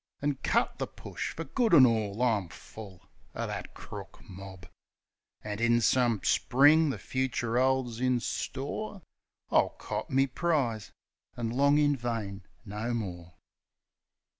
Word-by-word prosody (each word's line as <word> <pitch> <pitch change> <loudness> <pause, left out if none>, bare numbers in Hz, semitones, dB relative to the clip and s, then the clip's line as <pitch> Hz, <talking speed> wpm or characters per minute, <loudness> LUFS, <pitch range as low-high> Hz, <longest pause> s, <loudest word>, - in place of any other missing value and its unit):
An' 145 -1 -1
cut - - +1
the - - -2
push - - -6
fer 165 - -4
good 230 - +2
an' 130 - +9
all; 110 -1 0
I'm 105 -8 +1
full 100 -2 -12 0.3
Of - - -3
that - - -6
crook 100 -2 -9
mob! 95 -1 -10 0.8
An', 105 0 -4
in 120 0 +3
some 120 -3 +2
Spring 145 +5 +4
the 135 - -2
fucher 125 -2 -1
'olds 130 -3 +1
in 125 -1 +2
store, 150 - -4 0.5
I'll - - +4
cop - - -5
me 135 +1 +3
prize 130 - -1 0.5
an' 115 -2 -2
long 140 +4 +4
in 145 -1 +3
vain 115 -6 -4 0.2
no 110 +3 -3
more. 90 -6 -6
120 Hz, 140 wpm, -29 LUFS, 105-135 Hz, 0.8 s, an